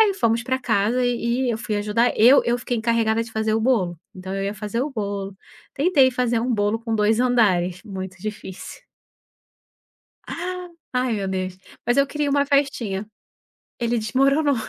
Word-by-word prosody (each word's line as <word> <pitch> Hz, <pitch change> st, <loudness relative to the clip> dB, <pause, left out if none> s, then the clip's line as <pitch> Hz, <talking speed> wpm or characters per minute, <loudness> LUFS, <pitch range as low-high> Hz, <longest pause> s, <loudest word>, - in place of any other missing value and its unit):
Aí 415 Hz, -3 st, +5 dB
fomos 230 Hz, -, +1 dB
pra 260 Hz, +1 st, -1 dB
casa 235 Hz, +1 st, +1 dB
e 240 Hz, -1 st, -1 dB, 0.2 s
e -, -, +2 dB
eu 225 Hz, -, -2 dB
fui 215 Hz, -1 st, -3 dB
ajudar, 210 Hz, +4 st, +1 dB
eu 245 Hz, +6 st, +7 dB
eu 240 Hz, +1 st, +1 dB
fiquei 245 Hz, 0 st, -3 dB
encarregada 225 Hz, 0 st, +1 dB
de 230 Hz, -, -10 dB
fazer 220 Hz, 0 st, 0 dB
o 220 Hz, -, +1 dB
bolo, 205 Hz, -9 st, +1 dB, 0.2 s
então 190 Hz, +1 st, -6 dB
eu 195 Hz, -, -2 dB
ia 200 Hz, +1 st, -2 dB
fazer 210 Hz, +3 st, -3 dB
o 290 Hz, -, -3 dB
bolo, 200 Hz, -4 st, -4 dB, 0.4 s
tentei 280 Hz, -3 st, +4 dB
fazer 240 Hz, -2 st, 0 dB
um 245 Hz, +1 st, 0 dB
bolo 205 Hz, +1 st, +1 dB
com 230 Hz, -1 st, -3 dB
2 220 Hz, +1 st, +2 dB
andares, 190 Hz, -8 st, +2 dB
muito 190 Hz, -2 st, -7 dB
difícil. 210 Hz, -3 st, -8 dB, 2.1 s
Ai 250 Hz, -1 st, +1 dB
meu 195 Hz, -2 st, -3 dB
Deus, 185 Hz, -1 st, -3 dB, 0.3 s
mas 240 Hz, +2 st, +1 dB
eu 280 Hz, 0 st, +4 dB
queria 295 Hz, 0 st, -1 dB
uma 280 Hz, 0 st, +2 dB
festinha. 250 Hz, -8 st, 0 dB, 0.7 s
Ele 235 Hz, 0 st, 0 dB
desmoronou. 275 Hz, +6 st, +2 dB
230 Hz, 170 wpm, -22 LUFS, 205-250 Hz, 2.1 s, eu